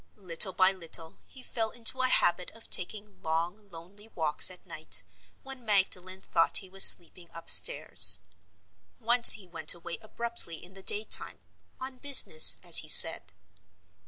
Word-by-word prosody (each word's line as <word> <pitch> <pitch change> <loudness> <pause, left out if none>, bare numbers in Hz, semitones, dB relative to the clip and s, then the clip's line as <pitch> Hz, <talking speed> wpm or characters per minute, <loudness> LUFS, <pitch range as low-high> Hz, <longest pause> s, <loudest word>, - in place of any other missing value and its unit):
Little 190 -1 +1
by 185 +1 -1
little 165 -3 -4
he 260 - -17
fell 225 -3 -7
into 240 +3 -1
a 255 - -2
habit 180 -6 -3
of 225 - -18
taking 200 +2 -5
long, 175 +6 -7
lonely 185 +5 -17
walks 160 -7 -1
at 185 - -15
night, - - -4 0.4
when 270 -2 -15
Magdalen 190 -3 -5
thought 165 0 -4
he 190 - -11
was 195 0 +4
sleeping 170 0 +1
upstairs. 170 - +3 0.8
Once 240 +1 +7
he 205 - -5
went 165 -2 -1
away 170 0 -13
abruptly 230 -6 -3
in 180 +2 -19
the 195 - -15
day 205 +2 -3
time—on 260 +3 -9
business, 265 - +4
as - - -2
he - - -11
said. 90 - +4
190 Hz, 150 wpm, -24 LUFS, 170-225 Hz, 0.8 s, Once